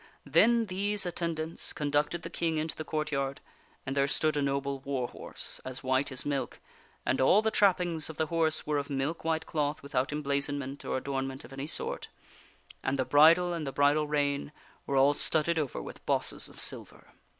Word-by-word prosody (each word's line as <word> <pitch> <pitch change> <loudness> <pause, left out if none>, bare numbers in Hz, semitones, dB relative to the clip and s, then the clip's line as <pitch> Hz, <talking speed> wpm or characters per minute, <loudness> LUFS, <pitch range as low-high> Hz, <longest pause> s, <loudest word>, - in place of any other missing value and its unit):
Then 225 - +4
these 200 +1 0
attendants 165 -2 -2
con 145 -1 -3
ducted 150 +4 +1
the - - -6
King 165 -2 -1
into 155 +1 -2
the 155 - -5
courtyard, 150 -3 -2 0.5
and 135 +1 -3
there 140 0 +3
stood 155 +2 +2
a 145 - +1
noble 140 0 -1
war 135 -2 -2
horse, - - -5
as 130 +1 -7
white 130 +2 +1
as 130 - -1
milk, 140 -2 -2 0.5
and 130 - +1
all 195 +11 +5
the 220 - +2
trappings 175 -7 +2
of 160 - -8
the 160 - +1
horse 160 0 0
were 150 -1 +1
of 140 - -5
milk 140 +4 -2
white 160 0 0
cloth 150 -2 -2
without 135 -1 -1
emblazonment 140 -1 -1
or - - -1
adornment 135 0 -3
of 135 - -12
any 135 +2 -5
sort; - - -2 0.7
and 135 +1 -1
the 130 - 0
bridle 160 +7 +6
*\nd 155 -4 -4
the - - -2
bridle 145 +2 +3
rein 145 -1 0 0.4
were 140 - -1
all 140 +2 +6
studded 160 +3 +1
over 145 -4 -2
with - - -9
bosses - - 0
of - - -14
silver. - - -1
145 Hz, 190 wpm, -30 LUFS, 140-160 Hz, 0.7 s, bridle